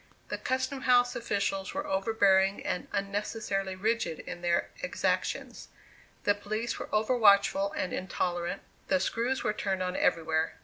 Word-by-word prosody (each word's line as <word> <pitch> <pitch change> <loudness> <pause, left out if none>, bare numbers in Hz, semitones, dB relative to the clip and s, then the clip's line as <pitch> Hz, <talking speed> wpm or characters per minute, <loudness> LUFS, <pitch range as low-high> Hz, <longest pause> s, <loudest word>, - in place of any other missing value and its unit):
The - - -2
custom 260 +1 -1
house 245 -1 +4
officials 200 -2 -2
were 290 +1 -2
overbearing 195 -2 +2
and 180 - -2
unnecessarily 200 -1 -2
rigid 215 -4 0
in 175 - -7
their 175 -1 +1
exactions; - - -2 0.6
the 205 - +4
police 215 +3 -3
were - - -6
over 215 +4 +2
watchful 200 -3 +4
and 185 - -2
intolerant; 175 -1 -2 0.2
the 190 - +3
screws 235 +7 -1
were 210 - +1
turned 190 -3 -1
on 180 0 -2
everywhere. 160 -1 +1
200 Hz, 140 wpm, -30 LUFS, 190-230 Hz, 0.6 s, house